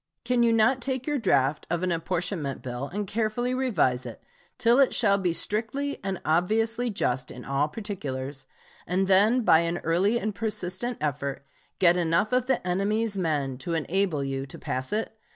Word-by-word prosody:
Can 245 0 +2
you 235 -1 +4
not 230 +3 +3
take 260 0 -2
your 295 -2 0
draft 140 - +1
of 170 +1 -1
an 185 - +1
apportionment 170 -3 -2
bill 125 +2 -4
and 205 +5 -3
carefully 225 +4 -1
revise 210 - +1
it - - -9 0.3
till 235 +3 +4
it 275 - +4
shall 200 -4 +3
be 180 -2 +1
strictly 225 +11 -1
and 190 -1 -3
obviously 220 +9 +1
just 130 - -1
in 125 - -9
all 140 +2 +1
particulars, 145 -9 -5 0.4
and 185 +2 +1
then 205 +6 +4
by 160 -8 +5
an 170 +1 -1
early 190 +8 +2
and 215 -1 -2
persistent 210 +3 -3
effort 140 -2 -3 0.3
get 175 -1 +4
enough 170 +6 +1
of 250 0 +2
the 265 - 0
enemies' 205 +4 0
men 145 -8 -1
to 165 +5 -3
enable 165 -1 0
you 135 0 -3
to - - -10
pass 130 0 -4
it? 220 +1 -2
190 Hz, 175 wpm, -26 LUFS, 150-225 Hz, 0.4 s, by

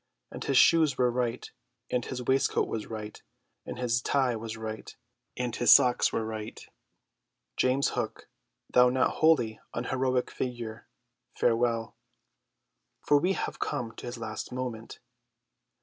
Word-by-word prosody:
And - - -6
his 135 - +1
shoes 160 -4 +5
were 125 -1 +3
right, 125 0 -2 0.4
and 125 -1 0
his 125 0 -5
waistcoat 130 +2 +1
was 110 - -4
right, 105 -1 -7 0.5
and - - -6
his 120 0 0
tie 130 -2 +1
was 115 0 -6
right, 110 0 -7 0.4
and 125 -2 -2
his 120 - +4
socks 125 -1 +6
were 110 - -1
right. 110 0 -6 1.0
James 130 +2 +2
Hook, - - -4 0.4
thou 125 0 +5
not 130 +1 +1
wholly 125 -9 +3 0.2
unheroic 130 +1 -1
figure, 120 -3 -5 0.5
farewell. 115 -1 +1 1.1
For 145 - +5
we 180 +5 +1
have - - -4
come 115 -2 -3
to - - -8
his 120 - -5
last 110 0 -6
moment. 125 -3 -5
125 Hz, 135 wpm, -28 LUFS, 115-130 Hz, 1.1 s, socks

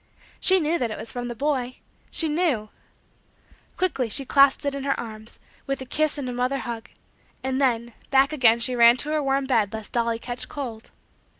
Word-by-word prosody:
She 380 0 +5
knew 325 +1 0
that 240 - -1
it 215 - -5
was 220 +1 -7
from 245 -1 -4
the 240 - -5
boy 260 -2 -1 0.3
she 325 - +1
knew. 300 -9 0 1.1
Quickly 285 -10 0
she 275 +5 +1
clasped 275 +2 +4
it 280 - 0
in 280 - -4
her 275 0 -1
arms, 220 -1 -8 0.3
with 275 0 -2
a 260 - -6
kiss 305 +3 0
and 280 -3 -4
a 250 - -3
mother 250 +3 0
hug; 235 -3 -6 0.5
and 265 +1 -1
then, 235 -3 0 0.2
back 275 +2 +4
again 235 -5 +5
she 245 +2 0
ran 235 0 +7
to 295 +4 -3
her 310 -1 +1
warm 275 0 0
bed 225 -6 +1
lest 220 -1 -7
dolly 235 -1 0
catch 245 +1 -7
cold. 240 -6 -6
255 Hz, 200 wpm, -24 LUFS, 235-280 Hz, 1.1 s, ran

